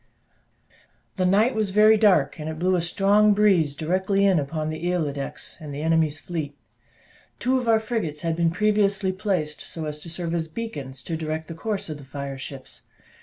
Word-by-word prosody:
The 185 -1 +2
night 210 +7 +3
was 215 -2 0
very 215 +3 +6
dark, 185 -10 +3
and 155 +1 -4
it 160 - -5
blew 185 +3 +2
a 175 - +1
strong 200 +4 +3
breeze 185 -9 +3
directly 190 +5 +1
in 190 -4 +4
upon 155 +2 -3
the 165 +3 -2
Isle 165 -5 0
d'Aix, 140 -1 -5
and 150 -2 -7
the 145 +2 -5
enemy's 160 -2 +2
fleet. 155 -4 -5 0.8
Two 260 +1 +1
of 245 - -5
our 225 -1 +5
frigates 215 -10 -3
had 165 -1 -1
been 170 0 +2
previously 200 +1 +2
so 185 - -11
placed 180 -7 -2
as 150 -2 -4
to 170 - -10
serve 170 0 -4
as 165 -1 -1
beacons 145 - -6
to 165 - -3
direct 160 0 -4
the - - -6
course 200 +5 -3
of 155 -2 -6
the - - -11
fire 140 0 -6
ships. 135 0 -8
170 Hz, 195 wpm, -24 LUFS, 155-200 Hz, 0.8 s, very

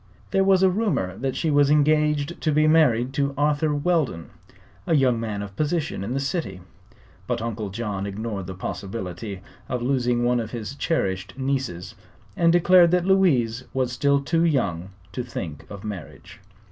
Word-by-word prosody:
There 195 -1 +3
was 190 -1 +4
a 190 - +6
rumor 185 - -1
that 135 0 -2
she 160 - 0
was 145 -1 +4
engaged 150 +1 +2
to 155 - +1
be 155 +1 +3
married 135 -6 +3
to 140 0 -1
Arthur 150 +1 +1
Weldon, 145 - 0 0.6
a 165 - +3
young 130 -5 +3
man 105 -3 -3
of 100 -1 -9
position 155 - -1
in 120 +6 -3
the - - 0
city; 140 - -3 0.7
but 120 -1 -1
Uncle 110 -2 -4
John 100 -1 -4
ignored 100 -2 -5
the 95 - -6
possibility 95 +1 -6 0.3
of 125 -2 -2
losing 125 -2 +1
one 120 0 +2
of 110 -2 -4
his 115 +1 -6
cherished 115 - -2
nieces 130 -10 -3 0.4
and 170 -1 +4
declared 175 0 +6
that 180 0 +2
Louise 130 -12 +2
was 130 -2 0
still 140 +3 +2
too 165 +4 0
young 100 - 0 0.2
to 125 - -3
think 90 - -7
of 100 -2 -9
marriage. 100 -7 -8
130 Hz, 170 wpm, -24 LUFS, 105-155 Hz, 0.7 s, a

